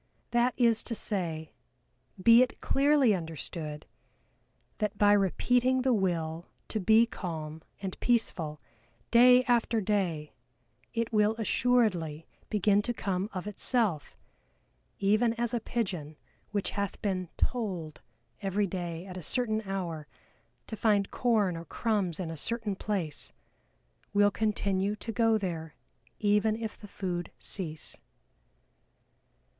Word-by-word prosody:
That 240 +1 +2
is 230 -3 +3
to 230 - -3
say, 165 -8 -3 0.7
be 230 +5 +7
it 255 - 0
clearly 275 -4 +3
understood, 160 -3 -5 0.9
that 210 -2 -1
by 205 0 +5
repeating 245 +6 +2
the 260 -1 +3
will 170 -5 -1 0.2
to 215 - -1
be 220 +4 +5
calm 160 -7 -6 0.2
and 190 -1 -5
peaceful, 170 -10 0 0.5
day 250 +1 +7
after 235 -2 +2
day, 185 -7 -1 0.6
it 230 0 -2
will 210 +1 +3
assuredly 210 -10 +1 0.2
begin 205 0 +3
to 240 +3 -3
come 195 0 -2
of 185 -1 -5
itself, 210 - -1 0.8
even 215 +4 +2
as 235 0 -1
a 240 - +1
pigeon 180 -11 -3 0.3
which 205 -2 -2
hath 200 -1 -3
been 185 -4 -1
"tolled" 185 -11 -2 0.4
every 200 +1 0
day 175 -2 -4
at 185 -1 -8
a - - -5
certain 220 - +1
hour 170 -6 -3 0.6
to - - -6
find 205 -2 +2
corn 215 -7 +2
or 165 - -6
crumbs 200 -7 -1
in 170 -3 -3
a - - -5
certain 220 +4 -2
place, 185 -8 -3 0.8
will 205 0 +5
continue 200 -1 0
to 225 +2 -6
go 225 -1 +3
there 165 -6 -4 0.4
even 210 +1 +2
if 220 -1 -5
the 210 - -12
food 180 -3 -4
cease. 160 -6 -1
205 Hz, 125 wpm, -29 LUFS, 175-230 Hz, 0.9 s, be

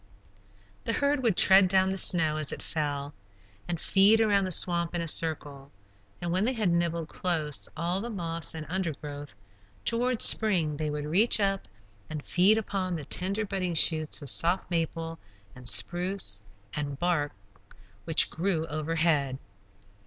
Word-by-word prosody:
The - - -2
herd 285 -1 0
would 225 -7 0
tread 190 0 +6
down 190 0 +2
the - - -3
snow 160 -5 +4
as 155 -2 0
it - - -7
fell, 145 -2 -4 0.5
and 175 -2 -4
feed 200 +5 +3
around 205 -3 +2
the 185 - -5
swamp 170 -1 +2
in 170 - -2
a 165 - -5
circle, 145 -4 +2 0.5
and 175 -1 -4
when 185 +3 +1
they 250 +4 0
had 215 -7 0
nibbled 170 -1 -2
close 160 -5 -3
all 175 +4 -2
the 235 - -6
moss 170 -6 -3
and 155 -1 -7
undergrowth, 150 - -6 0.5
toward 240 +1 +1
spring 170 -9 +3
they 155 0 -3
would 150 0 -5
reach 200 +10 +3
up 195 - -1 0.4
and 150 -2 -7
feed 195 +5 +3
upon 195 -4 -3
the 150 -4 -7
tender 195 +8 -3
budding 185 -3 -4
shoots 155 -1 +1
of 140 - +2
soft 175 +2 +1
maple 165 -1 -4 0.4
and 125 -2 -1
spruce 175 - 0 0.3
and 145 -2 -4
barks 155 -3 -2 0.7
which 160 - +4
grew 165 -2 -2
overhead. 155 -3 -1
170 Hz, 155 wpm, -27 LUFS, 155-190 Hz, 0.7 s, tread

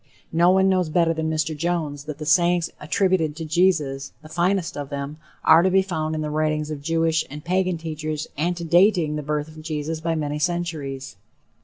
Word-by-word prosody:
No 170 +2 +4
one 190 +1 +4
knows 185 -3 +2
better 165 +1 +2
than 160 -1 -2
Mr. 155 0 -1
Jones 155 -3 -2
that 150 -2 -6
the 155 - -6
sayings 175 +2 +3
attributed 165 -1 +1
to 165 0 -5
Jesus 155 -5 +1
the 155 - -12
finest 175 +2 0
of 145 -1 -5
them 140 +1 -5 0.3
are 160 +1 +7
to 185 - +3
be 190 +1 +4
found 160 -4 -2
in 155 - -2
the 150 -1 -3
writings 155 0 0
of 145 -2 -5
Jewish 165 +1 +1
and 150 +3 -9
Pagan 185 0 +1
teachers 155 -1 -4
antedating 170 +1 +2
the 150 - -2
birth 150 0 -2
of 155 0 -11
Jesus 155 0 -3
by 165 0 0
many 150 -1 -2
centuries. 150 - -3
160 Hz, 190 wpm, -23 LUFS, 150-175 Hz, 0.3 s, are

